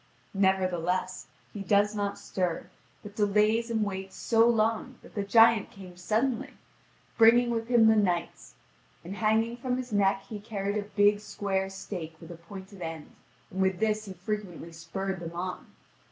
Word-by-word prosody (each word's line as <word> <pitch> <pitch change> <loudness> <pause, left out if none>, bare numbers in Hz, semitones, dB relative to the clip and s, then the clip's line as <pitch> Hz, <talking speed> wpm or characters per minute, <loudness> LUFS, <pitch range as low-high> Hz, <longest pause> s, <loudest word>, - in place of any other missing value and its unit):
Nevertheless, 185 -2 0 0.3
he 205 - -6
does 205 +2 +2
not 205 -1 -2
stir, 180 -3 -3 0.3
but 210 0 -10
delays 215 +3 +2
and 220 -2 +1
waits 190 -1 -5
so 230 0 +3
long 225 +3 +1
that - - -15
the 205 - -2
giant 225 +1 +5
came 185 -2 -12
suddenly, 225 +7 -1 0.6
bringing 240 +2 +6
with 230 -1 -2
him 235 -2 +5
the 220 0 +6
knights: 180 -5 -1 0.5
and 195 +4 -7
hanging 225 +2 +1
from 250 0 -2
his 250 -3 -6
neck 195 -1 +2
he 215 - -6
carried 205 -1 -3
a 210 - 0
big 205 0 +4
square 195 -2 -2
stake 180 -4 -7
with 165 0 -11
a - - -7
pointed 190 +3 -11
end, 160 -2 -6 0.4
and 190 - -3
with 190 -1 +2
this 215 0 0
he 195 - -7
frequently 185 -3 -5
spurred 190 +3 -5
them 170 0 -7
on. 180 +1 -5
200 Hz, 165 wpm, -28 LUFS, 185-220 Hz, 0.6 s, bringing